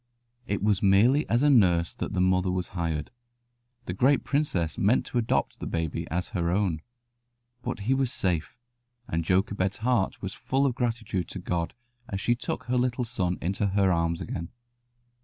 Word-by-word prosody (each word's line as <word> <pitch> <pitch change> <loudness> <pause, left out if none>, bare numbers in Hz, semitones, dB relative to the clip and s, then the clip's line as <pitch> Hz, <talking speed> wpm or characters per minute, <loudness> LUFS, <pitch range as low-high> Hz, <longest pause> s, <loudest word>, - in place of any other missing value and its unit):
It 100 -1 -1
was 105 -2 +2
merely 110 +9 +4
as 120 +4 +2
a 145 - +5
nurse 90 -9 +4
that - - -4
the 95 - 0
mother 90 0 +2
was 90 0 -2
hired. 80 -4 -3 0.7
The 90 - -3
great 130 +8 +3
princess 95 - 0
meant 105 +6 +2
to 120 - -1
adopt 115 - 0
the - - -5
baby 80 -2 -2
as 90 +3 -2
her 85 -2 -1
own. 90 -4 0 0.8
But 125 -3 -4
he 120 +7 +1
was 135 -2 +1
safe, 85 -3 -1 0.5
and 80 +1 -1
Jochebed's 95 +2 +1
heart 120 -6 +1
was 95 0 -5
full 135 +2 0
of 135 - +2
gratitude 115 -7 -2
to - - -7
God 85 -2 -2 0.3
as 100 - -3
she 120 - +2
took 120 - -4
her 125 +1 0
little 125 0 0
son 90 -6 -1
into 100 +4 0
her 95 -1 +2
arms 85 -1 0
again. 85 -1 -5
95 Hz, 175 wpm, -27 LUFS, 90-120 Hz, 0.8 s, a